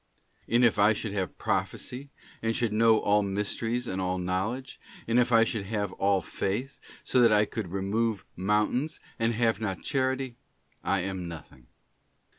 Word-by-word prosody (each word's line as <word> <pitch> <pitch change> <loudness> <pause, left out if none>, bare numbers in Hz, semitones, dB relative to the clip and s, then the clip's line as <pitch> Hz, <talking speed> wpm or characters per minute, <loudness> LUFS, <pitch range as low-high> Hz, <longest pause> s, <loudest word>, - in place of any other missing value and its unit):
And 120 +2 +4
if 110 -3 +3
I 105 +2 +6
should 105 -1 -4
have 95 -3 -3
prophecy, 135 +3 -2 0.3
and 115 0 0
should 120 -4 0
know 110 0 +5
all 105 +1 +3
mysteries 105 +4 -2
and 95 -2 -2
all 90 0 -1
knowledge, 95 +9 -3 0.3
and 115 +2 +3
if 125 0 +2
I 115 -1 +6
should 110 -4 -2
have 105 -3 -2
all 100 -1 +2
faith, 120 - -3 0.2
so 125 - +3
that 115 -2 +6
I 105 0 +5
could 105 -1 -4
remove 100 +2 -1
mountains, 105 - 0 0.2
and 115 0 +1
have 115 -2 +1
not 95 -4 -3
Charity, 130 -2 -1 0.5
I 100 -1 +1
am 95 -1 -4
nothing. 75 -7 -11
105 Hz, 165 wpm, -28 LUFS, 95-120 Hz, 0.5 s, I